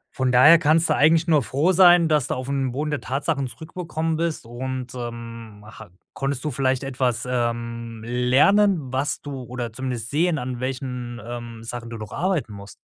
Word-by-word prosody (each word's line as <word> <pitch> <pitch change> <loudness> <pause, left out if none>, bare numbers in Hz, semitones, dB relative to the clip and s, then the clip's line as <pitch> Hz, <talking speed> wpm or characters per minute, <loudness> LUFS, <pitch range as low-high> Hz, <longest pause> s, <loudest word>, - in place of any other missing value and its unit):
von 130 -2 +1
daher 150 +7 +7
kannst 160 +1 +3
du - - +3
eigentlich 160 +3 +4
nur 155 -3 +4
froh 140 +8 +1
sein, 175 -2 +6
dass 150 -4 +2
du - - -2
auf 130 0 -5
'm 135 -2 -1
Boden 150 +4 -3
der 150 - -2
Tatsachen 140 +1 -2
zurückgekommen 160 +4 -4
bist 165 -4 -2
und, 130 +2 -5
ähm, 115 -3 -8
ha 105 -4 -12 0.3
konntest 135 -1 -2
du 150 - -1
vielleicht 130 0 0
etwas, 130 -3 -1
ähm, 115 -2 -3
lernen, 135 - +3
was 135 +3 -1
du 140 -2 -6
oder 120 -2 -6
zumindest 125 -2 -3
sehen, 165 +3 +1
an 125 -3 -4
welchen, 125 -2 -4
ähm, 120 -1 -7
Sachen 115 0 -6
du 115 - -6
noch 110 -1 -8
arbeiten 170 - -1
musst? 100 -1 -10
130 Hz, 180 wpm, -23 LUFS, 120-150 Hz, 0.3 s, daher